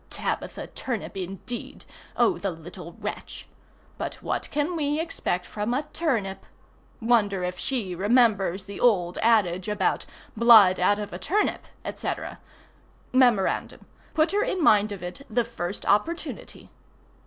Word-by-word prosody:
Tabitha -, -, -3 dB
Turnip 235 Hz, -5 st, -5 dB
indeed! 195 Hz, +6 st, -6 dB, 0.3 s
Oh 375 Hz, -, +3 dB
the 200 Hz, -, -1 dB
little 170 Hz, +1 st, -9 dB
wretch! -, -, -7 dB, 0.5 s
But -, -, -3 dB
what -, -, -4 dB
can 300 Hz, +4 st, -1 dB
we 295 Hz, -1 st, 0 dB
expect 320 Hz, -, -2 dB
from 215 Hz, +3 st, -2 dB
a 285 Hz, -, 0 dB
turnip? 225 Hz, -, -1 dB, 0.5 s
Wonder 215 Hz, -5 st, +2 dB
if 180 Hz, 0 st, -3 dB
she 225 Hz, -9 st, -1 dB
remembers 200 Hz, -2 st, +2 dB
the 200 Hz, 0 st, -8 dB
old 180 Hz, -7 st, +2 dB
adage 200 Hz, -5 st, +2 dB
about 210 Hz, -3 st, 0 dB, 0.3 s
"blood 220 Hz, -5 st, +7 dB
out 205 Hz, +3 st, +3 dB
of 210 Hz, -3 st, -6 dB
a 175 Hz, -, -5 dB
turnip," 390 Hz, -, 0 dB, 0.3 s
&c.? -, -, -4 dB, 1.0 s
[Mem. 245 Hz, -7 st, +4 dB, 0.6 s
put 310 Hz, +1 st, +3 dB
her 410 Hz, +1 st, +2 dB
in 370 Hz, -3 st, -1 dB
mind 210 Hz, -6 st, +5 dB
of 195 Hz, -3 st, -6 dB
it 180 Hz, +10 st, -7 dB
the 235 Hz, +1 st, +1 dB
first 200 Hz, -4 st, -5 dB
opportunity. 325 Hz, +12 st, -1 dB
210 Hz, 135 wpm, -26 LUFS, 185-250 Hz, 1.0 s, blood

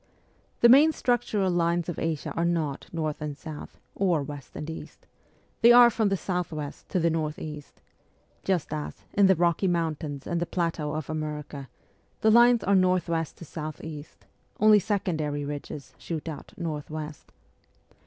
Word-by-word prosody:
The 235 Hz, -, +8 dB
main 285 Hz, +6 st, +7 dB
structural 225 Hz, -8 st, +1 dB
lines 170 Hz, -1 st, +1 dB
of 175 Hz, -, -4 dB
Asia 160 Hz, -3 st, -2 dB
are 170 Hz, -, -1 dB
not 165 Hz, -5 st, -1 dB
north 155 Hz, -3 st, -3 dB
and 150 Hz, -2 st, -4 dB
south, 155 Hz, -2 st, -9 dB
or 175 Hz, -7 st, +1 dB
west 145 Hz, -1 st, -9 dB
and 150 Hz, -, -5 dB
east; 160 Hz, -, -9 dB, 0.6 s
they 235 Hz, -, +8 dB
are 240 Hz, 0 st, +9 dB
from 220 Hz, -2 st, +1 dB
the 195 Hz, -, +1 dB
south 180 Hz, -2 st, -2 dB
west 150 Hz, -2 st, -7 dB
to 185 Hz, -, 0 dB
the 170 Hz, 0 st, +2 dB
north 155 Hz, -2 st, -2 dB
east 150 Hz, -2 st, -9 dB, 0.6 s
just 180 Hz, -5 st, 0 dB
as, 150 Hz, -1 st, -5 dB
in 200 Hz, -1 st, +5 dB
the 190 Hz, -, +5 dB
Rocky 175 Hz, +3 st, +2 dB
Mountains 160 Hz, -5 st, -2 dB
and 170 Hz, 0 st, -1 dB
the 175 Hz, -, -1 dB
plateaux 165 Hz, -4 st, -1 dB
of 155 Hz, -2 st, -4 dB
America, 150 Hz, -3 st, -5 dB, 0.5 s
the 220 Hz, -, +5 dB
lines 240 Hz, +1 st, +6 dB
are 200 Hz, -, +2 dB
north 185 Hz, -2 st, +3 dB
west 165 Hz, -2 st, -2 dB
to 170 Hz, -, -10 dB
south 155 Hz, -1 st, -7 dB
east; 155 Hz, -2 st, -9 dB, 0.3 s
only 215 Hz, 0 st, +7 dB
secondary 155 Hz, -8 st, -1 dB
ridges 145 Hz, 0 st, -7 dB
shoot 165 Hz, -2 st, -5 dB
out 155 Hz, -3 st, -7 dB
north 155 Hz, -4 st, -4 dB
west. 155 Hz, -1 st, -7 dB
165 Hz, 170 wpm, -27 LUFS, 150-185 Hz, 0.6 s, are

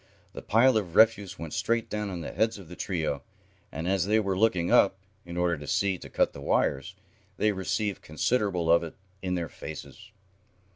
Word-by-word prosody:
The -, -, -7 dB
pile 120 Hz, +2 st, +4 dB
of 90 Hz, -6 st, -3 dB
refuse 105 Hz, -4 st, +4 dB
went 80 Hz, -2 st, -7 dB
straight 115 Hz, 0 st, 0 dB
down 105 Hz, -2 st, -3 dB
on 90 Hz, -3 st, -5 dB
the -, -, -5 dB
heads 110 Hz, 0 st, 0 dB
of 95 Hz, -5 st, -12 dB
the 90 Hz, -, -9 dB
trio, 80 Hz, -8 st, -2 dB, 0.5 s
and, 80 Hz, +4 st, -4 dB
as 95 Hz, -1 st, +1 dB
they 110 Hz, +2 st, +4 dB
were 100 Hz, -3 st, 0 dB
looking 90 Hz, -4 st, +2 dB
up, 95 Hz, -1 st, +5 dB, 0.3 s
in 85 Hz, 0 st, -6 dB
order 85 Hz, -2 st, +1 dB
to 75 Hz, -, -9 dB
see 95 Hz, +2 st, +1 dB
to -, -, -10 dB
cut -, -, +1 dB
the 70 Hz, -, -9 dB
wires, -, -, 0 dB, 0.4 s
they 105 Hz, -, +2 dB
received 100 Hz, +1 st, -2 dB
considerable 90 Hz, -, 0 dB
of 85 Hz, -, +6 dB
it 85 Hz, -2 st, -7 dB, 0.3 s
in 90 Hz, -1 st, -1 dB
their 85 Hz, -2 st, -2 dB
faces. 110 Hz, +7 st, -9 dB
95 Hz, 195 wpm, -28 LUFS, 85-105 Hz, 0.5 s, of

